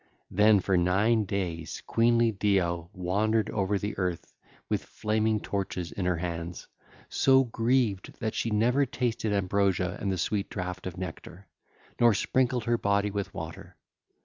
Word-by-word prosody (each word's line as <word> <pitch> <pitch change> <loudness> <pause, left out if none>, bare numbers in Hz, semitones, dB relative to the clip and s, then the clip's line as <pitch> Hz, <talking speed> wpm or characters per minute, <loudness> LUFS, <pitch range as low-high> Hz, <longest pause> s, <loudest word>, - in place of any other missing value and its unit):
Then 105 +1 +5
for 95 0 +1
nine 100 +5 +2
days 90 -5 -4
queenly 115 0 +3
Deo 90 -5 0
wandered 105 +4 0
over 100 0 0
the 105 +2 -3
earth 90 -3 -3 0.3
with - - -1
flaming 110 0 0
torches 95 -4 -3
in 95 - -3
her 90 -1 +1
hands, 85 0 -5 0.4
so 135 0 +4
grieved 115 -4 0
that 110 -1 -2
she 115 - -1
never 120 +6 +2
tasted 120 -4 -1
ambrosia 95 -2 +1
and 100 - 0
the 95 - -1
sweet 100 +3 -1
draught 90 -1 -5
of 90 - -7
nectar, 90 +1 -8 0.5
nor 120 -3 +5
sprinkled 125 +2 +1
her 120 +1 +1
body 100 0 +1
with 100 -1 -3
water. - - -8
100 Hz, 145 wpm, -28 LUFS, 90-110 Hz, 0.5 s, Then